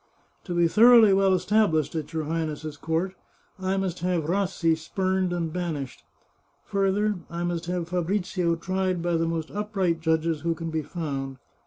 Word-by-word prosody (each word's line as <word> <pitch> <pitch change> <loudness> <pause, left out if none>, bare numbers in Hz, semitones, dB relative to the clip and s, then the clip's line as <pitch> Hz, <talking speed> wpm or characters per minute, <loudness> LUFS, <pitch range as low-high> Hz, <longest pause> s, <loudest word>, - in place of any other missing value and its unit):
" - - -40
To 175 - -3
be 170 -1 +4
thoroughly 225 +2 +7
well 195 0 +4
established 185 -5 +2
at 155 -3 -4
your 160 -1 -2
Highness's 155 -1 -3
court, 165 +5 -2 0.5
I 190 +1 -1
must 190 -2 -2
have 175 -1 0
Rassi 175 -1 +1
spumed 185 +3 -1
and 165 -2 -2
banished. 160 -7 -4 0.6
Further, 200 +1 +1
I 170 +1 -4
must 175 -1 -2
have 175 -1 -2
Fabrizio 180 -1 0
tried 185 0 -1
by 175 -1 +1
the 165 0 +1
most 165 -1 -3
upright 195 -5 -1
judges 160 -1 +1
who 170 0 0
can 165 0 -5
be 160 0 -1
found. 140 -4 -4
175 Hz, 165 wpm, -26 LUFS, 160-190 Hz, 0.6 s, thoroughly